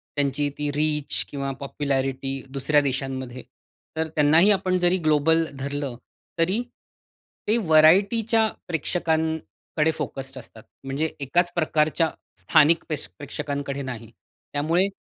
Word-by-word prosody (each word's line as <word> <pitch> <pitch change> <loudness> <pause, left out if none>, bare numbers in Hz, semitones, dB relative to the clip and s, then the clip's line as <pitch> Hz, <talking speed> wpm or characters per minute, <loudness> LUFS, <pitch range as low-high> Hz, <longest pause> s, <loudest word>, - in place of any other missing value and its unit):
त्यांची 145 0 0
ती 150 0 -1
रीच 150 -1 0
किंवा 140 -1 -3
पॉप्युलॅरिटी 135 -1 -2
दुसऱ्या 140 +2 +2
देशांमध्ये. 130 -2 -4 0.5
तर 160 0 0
त्यांनाही 155 +7 +5
आपण 185 -2 +2
जरी 180 +1 +3
ग्लोबल 160 +2 +3
धरलं, 140 -1 -3 0.4
तरी 185 +7 +2 0.9
ते 215 +3 +3
व्हरायटीच्या 200 +6 +4 0.2
प्रेक्षकांकडे 160 -1 -1
फोकस्ड 135 -3 -5
असतात. 115 -2 -14 0.2
म्हणजे 140 +4 -2
एकाच 175 +6 +1
प्रकारच्या 155 0 +1 0.3
स्थानिक 160 +1 +4
प्रेश 155 -3 -3
प्रेक्षकांकडे 140 -1 -4
नाही. 115 -4 -7 0.4
त्यामुळे 165 +6 +2
150 Hz, 110 wpm, -24 LUFS, 140-165 Hz, 0.9 s, त्यांनाही